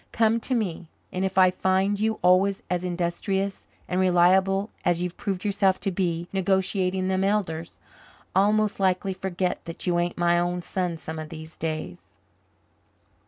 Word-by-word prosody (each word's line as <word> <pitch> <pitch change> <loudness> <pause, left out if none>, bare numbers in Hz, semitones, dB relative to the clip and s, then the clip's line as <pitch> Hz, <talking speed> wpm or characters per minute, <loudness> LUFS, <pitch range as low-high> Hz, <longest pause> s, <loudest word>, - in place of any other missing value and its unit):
Come 225 0 +2
to 255 +3 -1
me 180 -7 -2 0.3
and 185 - -1
if 190 0 -2
I 185 -1 +6
find 190 +2 +1
you 220 +1 +1
always 190 +2 +3
as 180 0 0
industrious 185 +3 -2 0.2
and 180 - -1
reliable 190 +3 +3
as 175 -1 +2
you've 180 0 -3
proved 195 -1 -4
yourself 195 -2 +2
to 195 - -1
be 175 -2 -1
negotiating 190 0 +1
them 190 0 +1
elders, 180 -5 -1 0.6
I'll 200 +2 +5
most 215 -1 +1
likely 190 0 +1
forget 185 -1 -2
that 165 - -6
you 175 -1 +2
ain't 175 0 -1
my 175 0 +3
own 175 0 -1
son 180 -2 -2
some 160 0 -7
of 155 -1 -6
these 160 -1 -9
days." 155 - -5
185 Hz, 165 wpm, -25 LUFS, 175-195 Hz, 0.6 s, I